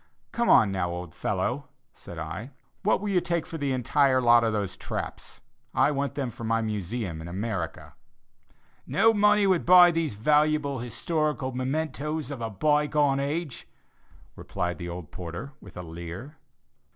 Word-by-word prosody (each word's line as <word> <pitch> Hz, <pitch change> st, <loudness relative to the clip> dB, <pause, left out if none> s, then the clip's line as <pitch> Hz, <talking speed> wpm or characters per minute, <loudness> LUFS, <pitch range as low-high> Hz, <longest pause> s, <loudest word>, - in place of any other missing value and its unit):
"Come 180 Hz, -, +4 dB
now, 95 Hz, -2 st, -1 dB
old 85 Hz, -2 st, -6 dB
fellow," -, -, -2 dB, 0.3 s
said 85 Hz, -, -11 dB
I, 80 Hz, -, -5 dB, 0.3 s
"what 210 Hz, -, +2 dB
will 205 Hz, +1 st, -3 dB
you 185 Hz, -3 st, +2 dB
take 170 Hz, -2 st, -1 dB
for 165 Hz, -, -7 dB
the 140 Hz, -1 st, -1 dB
entire 130 Hz, +1 st, +3 dB
lot 120 Hz, -1 st, +5 dB
of 115 Hz, -, +1 dB
those 100 Hz, -3 st, -2 dB
traps? -, -, -6 dB, 0.3 s
I 150 Hz, -, +4 dB
want 140 Hz, 0 st, -2 dB
them 135 Hz, -4 st, -2 dB
for 115 Hz, -, -10 dB
my 115 Hz, 0 st, +1 dB
Museum 105 Hz, -5 st, -3 dB
in 80 Hz, -, -8 dB
America." 95 Hz, -1 st, -4 dB, 0.9 s
"No 225 Hz, +3 st, +4 dB
money 210 Hz, -1 st, +4 dB
would 185 Hz, -3 st, +3 dB
buy 180 Hz, 0 st, +8 dB
these 165 Hz, -8 st, -1 dB
valuable 150 Hz, +3 st, +2 dB
historical 135 Hz, +3 st, -2 dB
mementos 145 Hz, +2 st, -2 dB
of 135 Hz, -4 st, -6 dB
a 115 Hz, -, -2 dB
by 150 Hz, +8 st, +2 dB
gone 145 Hz, -2 st, +2 dB
age," 145 Hz, 0 st, -3 dB, 0.7 s
replied 90 Hz, -2 st, -4 dB
the 85 Hz, -1 st, -5 dB
old 85 Hz, -3 st, -7 dB
porter 85 Hz, +9 st, -7 dB
with 95 Hz, -, -13 dB
a 90 Hz, -, -5 dB
leer. 85 Hz, -, -8 dB
130 Hz, 160 wpm, -27 LUFS, 100-155 Hz, 0.9 s, buy